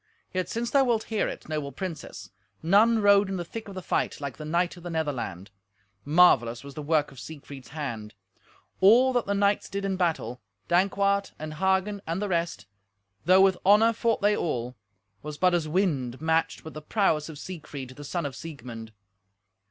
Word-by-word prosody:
Yet 185 -1 -2
since 235 +1 -3
thou 275 -1 +5
wilt 235 -4 +1
hear 215 - +1
it, - - -7
noble 150 -2 -3
princess, 180 -4 -7 0.3
none 215 +6 +4
rode 200 -1 +5
in 195 - -2
the 175 - -4
thick 225 +6 -8
of 200 - -9
the 185 - -6
fight - - -1
like 140 -3 -5
the 155 - -7
knight 170 +4 0
of 175 - -13
the 175 - -7
Netherland. 125 - -3 0.5
Marvellous 140 -7 +4
was 140 0 -10
the 150 - -6
work 150 -1 +1
of 135 - -12
Siegfried's 140 -3 -10
hand. 120 -9 -6 0.6
All 240 +7 +6
that 245 -4 0
the 200 - 0
knights 200 0 +1
did 200 0 -3
in 195 -1 -1
battle—Dankwart 175 - 0
and 155 0 -6
Hagen 190 +4 0
and 165 +3 -2
the 205 0 -2
rest—though 100 - -1
with 190 -1 +4
honour 210 +4 +5
fought 230 0 0
they 205 0 +4
all, 125 - -2 0.5
was 150 0 -7
but 180 +2 +3
as 170 -3 +1
a - - -7
wind 145 -9 0
matched 160 0 0
with 160 - -8
the 155 - -7
prowess 160 -3 +1
of 155 - -9
Siegfried, 145 -6 -8
the 145 +3 -11
son 170 +3 -3
of 140 - -5
Siegmund. 120 -8 -9
165 Hz, 185 wpm, -27 LUFS, 140-195 Hz, 0.6 s, All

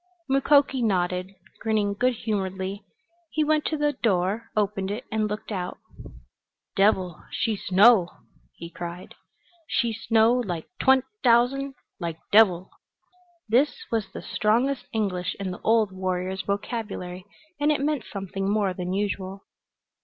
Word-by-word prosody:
Mukoki 275 0 +3
nodded, 185 -3 0 0.3
grinning 215 -2 +1
good 250 +5 +1
humoredly. 195 -2 -3 0.5
He 310 - +1
went 305 0 +2
to 310 - -1
the 295 0 +1
door, 210 -1 0
opened 200 -2 0
it 215 +5 -4
and 215 -1 +1
looked 210 +1 -5
out. 180 -3 -3 1.0
"Devil 190 -4 +2
she 220 0 -1
snow!" 195 -1 +5 0.5
he 170 0 -9
cried. 175 +1 -7 0.5
"She 235 -3 0
snow 225 +1 +3
like 190 -10 -2
twent' 265 -1 +4 0.2
t'ousand 260 +3 +3 0.2
like 170 -3 -4
devil!" 190 -4 +5 0.8
This 295 - +2
was 220 -4 -1
the - - -8
strongest 240 +6 +1
English 190 -5 -1
in 195 -2 -3
the 180 - -8
old 220 -3 +3
warrior's 185 0 -2
vocabulary, 200 -3 -4 0.4
and 295 +1 +3
it 300 - +1
meant 290 -3 0
something 195 0 -4
more 205 -2 +1
than 180 0 -4
usual. 195 -1 -3
210 Hz, 130 wpm, -25 LUFS, 190-240 Hz, 1.0 s, snow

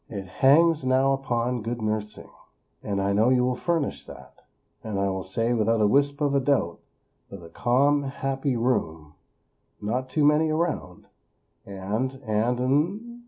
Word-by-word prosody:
"it 100 -4 -6
hangs 150 - +3
now 130 +1 +2
upon 125 -3 -2
good 120 +2 -4
nursing; 110 -1 -4 0.5
and 100 -1 -3
I 100 +1 0
know 110 +4 +3
you 125 -1 +3
will 125 0 0
furnish 165 -2 -2
that. - - -14 0.4
And 105 -3 -3
I 100 0 +1
will 95 0 -3
say 115 +6 -1
without 115 0 +1
a 105 - +3
wisp 140 +6 +2
of 145 -1 +1
a 140 - +3
doubt, 130 -11 0 0.5
that 100 -3 -10
a 85 - -12
calm, 140 +10 +2
happy 135 -1 -2
room; 80 - -2 0.7
not 125 +5 -3
too 150 +3 0
many 150 +2 +3
around; 155 - -3 0.6
and 105 +7 -3
and 110 +3 0
hmmm!! 170 - -1
125 Hz, 160 wpm, -25 LUFS, 105-140 Hz, 0.7 s, hangs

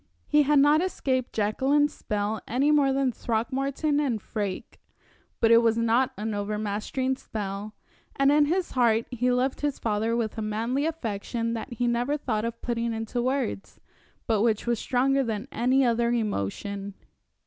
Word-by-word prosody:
He 300 0 +4
had 295 +1 +3
not 295 +3 +5
escaped 260 -8 -1
Jacqueline's 270 +8 +1
spell 210 +1 -3
any 270 +6 +2
more 285 -2 +4
than 270 -1 +1
Throckmorton 270 +6 -1
and 260 -7 0
Freke; 200 -2 -5 0.6
but 230 - +4
it 230 - +8
was 230 -1 +2
not 230 +3 +2
an 215 +1 -3
overmastering 210 +5 -2
spell, 205 -1 -5 0.4
and 275 0 +4
in 295 0 +5
his 355 +4 -1
heart 230 -3 +2
he 250 0 +1
loved 255 +2 0
his 290 -2 -1
father 220 +1 0
with 225 -1 -2
a - - -2
manly 230 +7 -1
affection 230 -5 -3
that 230 +1 -5
he 245 +1 -1
never 240 +5 0
thought 225 -6 -2
of 230 0 -5
putting 235 -1 -1
into 225 +2 -3
words, 255 -5 -2 0.5
but 220 -4 +1
which 220 -2 +1
was 235 -2 0
stronger 270 +2 +1
than 220 -4 -3
any 255 +3 +2
other 235 0 +2
emotion. 200 - -3
235 Hz, 160 wpm, -26 LUFS, 220-270 Hz, 0.6 s, it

